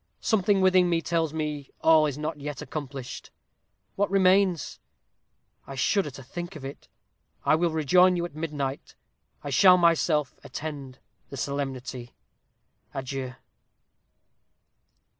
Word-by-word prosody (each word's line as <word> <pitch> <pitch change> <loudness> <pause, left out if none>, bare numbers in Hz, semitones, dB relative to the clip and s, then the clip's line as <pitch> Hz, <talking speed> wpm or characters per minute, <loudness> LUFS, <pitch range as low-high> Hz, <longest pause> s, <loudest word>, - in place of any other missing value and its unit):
Something 200 -2 +2
within 180 -2 +4
tells 165 -3 0
me 150 -3 -4
all 160 -1 +5
is 145 -2 -4
not 155 0 -4
yet 145 -1 -5
accomplished. 135 -4 -7 0.7
What 205 0 +1
remains? 190 -3 +2 0.9
I 135 - -7
shudder 185 +6 +1
to 135 0 -11
think 175 +7 -7
of 140 -3 -8
it. 135 - -9 0.6
I - - +4
will 170 +2 +2
rejoin 180 +4 +4
you 175 -1 -1
at 175 - -8
midnight. 145 -3 -4 0.5
I 145 - -5
shall 180 +6 +7
myself 165 -4 +2
attend 140 -1 -7 0.3
the 140 - -8
solemnity. 130 -2 -4 0.8
Adieu!" 130 -1 -4
155 Hz, 120 wpm, -26 LUFS, 140-175 Hz, 0.9 s, shall